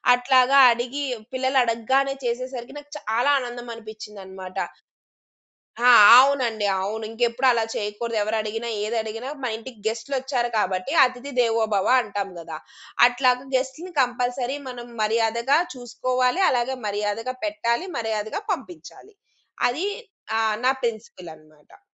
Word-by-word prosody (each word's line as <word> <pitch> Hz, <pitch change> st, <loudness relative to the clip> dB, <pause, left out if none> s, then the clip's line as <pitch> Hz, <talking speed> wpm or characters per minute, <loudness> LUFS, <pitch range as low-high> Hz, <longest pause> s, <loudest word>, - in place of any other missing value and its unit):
అట్లాగా 255 Hz, +2 st, +4 dB
అడిగి 245 Hz, +5 st, -3 dB, 0.3 s
పిల్లలడగ్గానే 260 Hz, +1 st, +1 dB
చేసేసరికి 250 Hz, +2 st, -4 dB
నాకు 290 Hz, 0 st, -18 dB, 0.2 s
చాలా 240 Hz, +6 st, +2 dB
ఆనందం 240 Hz, -1 st, -7 dB
అనిపించిందనమాట. 195 Hz, -4 st, -10 dB, 1.2 s
ఆ! 245 Hz, +1 st, +5 dB, 0.3 s
అవునండి. 250 Hz, -6 st, +1 dB
అవును. 215 Hz, +3 st, -3 dB
ఇంకెప్పుడు 240 Hz, +3 st, 0 dB
అలా 230 Hz, -2 st, +1 dB
చేయకూడదు. 215 Hz, +2 st, -3 dB
ఎవరు 215 Hz, +1 st, -2 dB
అడిగినా 225 Hz, +2 st, -4 dB
ఏదడిగినా 225 Hz, +3 st, -3 dB
మా 245 Hz, -, -1 dB
ఇంటికి 230 Hz, -1 st, -11 dB
గెస్ట్‌లొచ్చారు 250 Hz, +2 st, -2 dB
కాబట్టి 185 Hz, +4 st, -1 dB
అతిథి 255 Hz, +2 st, -2 dB
దేవోభవ 220 Hz, -4 st, +1 dB
అంటాం 200 Hz, -2 st, -4 dB
గదా! 160 Hz, -1 st, -8 dB, 0.5 s
అట్లాగా 250 Hz, 0 st, +1 dB
గెస్ట్‌లని 270 Hz, +8 st, -3 dB
కంపల్సరీ 250 Hz, +2 st, -1 dB
మనం 240 Hz, -1 st, -8 dB
మర్యాదగా 230 Hz, +5 st, +2 dB, 0.2 s
చూసుకోవాలి. 250 Hz, +5 st, -1 dB
అలాగే 255 Hz, +1 st, 0 dB
మర్యాదగా 210 Hz, +5 st, -3 dB
పెట్టాలి. 310 Hz, +1 st, -1 dB
మర్యాదగా 220 Hz, -, -3 dB
పంపించాలి. 225 Hz, -, -8 dB, 0.6 s
అది 315 Hz, +11 st, -2 dB, 0.5 s
ఆహ్, 220 Hz, -1 st, +1 dB
నా 260 Hz, -, +5 dB
ప్రిన్సిపుల్ 220 Hz, -7 st, -5 dB
అనమాట. 155 Hz, -1 st, -22 dB
240 Hz, 110 wpm, -23 LUFS, 220-255 Hz, 1.2 s, ఆ